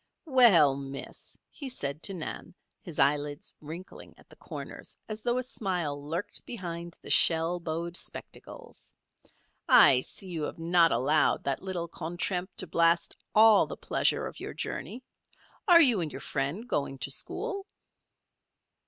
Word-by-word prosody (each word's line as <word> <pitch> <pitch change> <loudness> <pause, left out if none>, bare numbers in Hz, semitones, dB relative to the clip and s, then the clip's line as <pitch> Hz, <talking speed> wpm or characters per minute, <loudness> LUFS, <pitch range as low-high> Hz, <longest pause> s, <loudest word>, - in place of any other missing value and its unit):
"Well, 225 - +6
Miss," 135 0 -8
he 280 -3 -7
said 145 - -3
to 195 - +1
Nan, 170 +1 -6 0.3
his 170 -8 -9
eyelids 145 +1 0
wrinkling 165 +5 -10
at - - -21
the - - -16
corners - - -8
as 215 0 -6
though 240 +2 0
a 255 - -1
smile 180 - -3
lurked 165 +6 -3
behind 170 -6 -6
the - - -6
shell 165 +1 +4
bowed 170 +1 -4
spectacles, - - -8 0.7
"I 125 -2 +7
see 190 +7 -5
you 165 -3 -4
have - - -6
not 165 0 +3
allowed 150 +4 +2
that 135 -1 -1
little 185 -3 -4
contretemps 175 +3 -4
to - - 0
blast 170 0 +1 0.2
all 215 -1 +6
the - - -7
pleasure - - 0
of - - -8
your - - -7
journey. 255 - -5 0.6
Are 345 -3 +8
you 240 - +3
and 155 -3 -3
your 135 - -7
friend 150 - -3
going 140 - -2
to 140 - -4
school?" 395 - -2
170 Hz, 150 wpm, -29 LUFS, 150-210 Hz, 0.7 s, Are